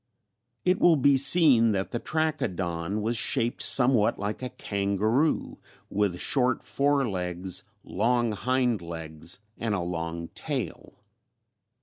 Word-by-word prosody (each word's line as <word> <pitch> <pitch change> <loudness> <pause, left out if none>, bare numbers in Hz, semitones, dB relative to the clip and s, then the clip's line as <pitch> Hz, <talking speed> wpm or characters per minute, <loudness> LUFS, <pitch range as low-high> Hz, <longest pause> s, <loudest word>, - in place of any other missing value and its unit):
It 180 +1 +2
will 170 -2 +5
be 140 0 +4
seen 135 -5 +5
that 95 -2 -2
the 120 - -2
Trachodon 100 - -2
was 115 +2 -1
shaped 120 -1 0
somewhat 125 -4 +3
like 105 +3 -4
a 125 - -4
kangaroo, 105 +10 -1 0.3
with 100 -4 0
short 130 -2 +1
fore 140 -1 +1
legs, 90 -2 -3 0.2
long 120 +3 0
hind 125 0 0
legs, 80 +1 -7 0.2
and 110 -3 -1
a - - -1
long 85 -1 -4
tail. - - -5
110 Hz, 120 wpm, -27 LUFS, 90-130 Hz, 0.3 s, will